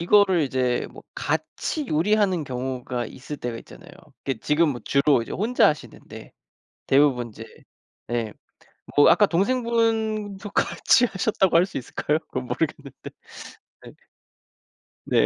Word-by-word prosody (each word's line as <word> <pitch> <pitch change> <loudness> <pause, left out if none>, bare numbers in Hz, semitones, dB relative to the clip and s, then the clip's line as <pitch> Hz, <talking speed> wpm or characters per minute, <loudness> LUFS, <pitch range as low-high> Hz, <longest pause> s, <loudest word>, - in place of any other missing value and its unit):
이거를 190 0 +4
이제 130 -2 0
뭐 - - -13
같이 305 -3 -3
요리하는 185 +1 +2
경우가 125 -1 -4
있을 140 +5 -8
때가 120 -4 -5
있잖아요. - - -14 0.3
이게 135 -4 -2
지금 150 +1 +2
뭐 120 - -5
주로 140 -2 +3
이제 - - -8
혼자 225 +7 +3
하시는데 150 - -7 0.5
대부분 135 -4 +3
이제 110 +1 -10 0.7
예 115 -3 -2 0.7
뭐 145 - +8
아까 210 - +5
동생분도 220 -1 0
같이 245 +4 +3
하셨다고 190 -3 +1
할 170 - +6
수 185 - -5
있을까요? 150 +4 -1
그건 130 -5 -6
모르겠는데. 145 -4 -3 0.8
네. - - -11 1.1
네. - - +3
155 Hz, 285 characters per minute, -24 LUFS, 130-205 Hz, 1.1 s, 뭐